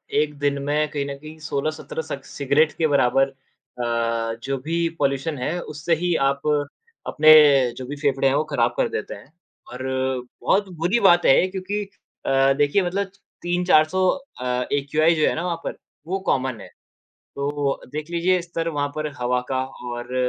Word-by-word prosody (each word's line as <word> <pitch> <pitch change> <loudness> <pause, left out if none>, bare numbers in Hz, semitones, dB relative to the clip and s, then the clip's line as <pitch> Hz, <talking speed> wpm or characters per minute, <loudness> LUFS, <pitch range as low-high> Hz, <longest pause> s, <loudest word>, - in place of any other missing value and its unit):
1 150 0 +1
दिन 140 -1 0
में 150 +2 +1
कहीं 145 -2 -3
न 140 0 -5
कहीं 155 +2 -11
16-17 155 +1 -3
स 140 - -3
सिगरेट 145 +3 +2
के 160 - +2
बराबर 135 -1 +3
अ, 115 -3 -3
जो 135 0 -2
भी 165 +5 -1
पॉल्यूशन 140 +2 0
है 150 +8 -2
उससे 150 +2 -1
ही 175 +2 0 0.2
आप 140 0 -3 0.7
अपने 155 +1 +5 0.5
जो 130 - -6
भी 140 +3 -6
फेफड़े 140 -2 +1
हैं 135 - +2
वो 150 - +2
ख़राब - - +1
कर - - +1
देते 450 +3 -4
हैं। - - -15 0.4
और 125 +1 -7 0.6
बहुत 200 0 +2
बुरी 175 +9 +1
बात 175 -4 +5
है 155 +7 +5
क्योंकि 195 +2 -3 0.4
अ, 135 0 +3
देखिए 145 +7 +2
मतलब 195 +2 -2 0.3
3-400 175 0 +3 0.3
अ, 125 0 -1
एक्यूआइ 150 +4 +2
जो 155 - +2
है - - +1
ना 165 - -3
वहाँ 170 -2 -1
पर, - - -5 0.3
वो 190 +2 -1
कॉमन 130 -3 0
है। - - -10 0.7
तो 140 0 -1
देख 155 +2 -5
लीजिये 175 +2 +2
स्तर 165 -1 -3
वहाँ 145 -3 -1
पर 155 0 -2
हवा 125 0 0
का 130 -1 0 0.2
और 120 +1 -6
150 Hz, 170 wpm, -23 LUFS, 135-170 Hz, 0.7 s, अपने